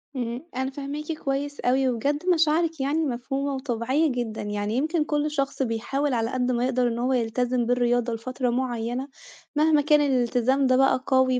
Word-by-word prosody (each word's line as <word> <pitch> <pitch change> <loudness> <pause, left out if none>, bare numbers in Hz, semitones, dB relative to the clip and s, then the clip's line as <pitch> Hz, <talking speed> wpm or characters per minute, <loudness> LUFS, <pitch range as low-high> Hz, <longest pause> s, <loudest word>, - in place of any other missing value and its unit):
إمم، 245 +2 -3
أنا 265 +1 -2
فاهماكِ 290 +3 -5
كويس 285 -1 -3
أوي، 260 +1 +2
وبجد 285 +7 -1
مشاعرِك 325 -1 +2
يعني 300 +4 0
مفهومة 270 +2 -2
وطبيعيّة 260 +3 0
جدًا، 240 -3 -3
يعني 205 +1 -2
يمكن 310 +2 +1
كل 300 0 -1
شخص 275 -2 -2
بيحاول 255 +4 -1
على 230 -1 0
قد 255 0 0
ما 240 0 0
يقدر 255 -1 +1
إن 235 0 -2
هو 255 +2 +1
يلتزم 245 +1 0
بالرياضة 245 -1 +1
لفترة 250 +2 -2
معيّنة، 245 +1 -2 0.5
مهما 305 0 +4
كان 300 0 +4
الالتزام 260 0 +2
ده 255 - +4
بقى 270 -1 +3
قوي 260 -1 +3
260 Hz, 170 wpm, -25 LUFS, 240-285 Hz, 0.5 s, مهما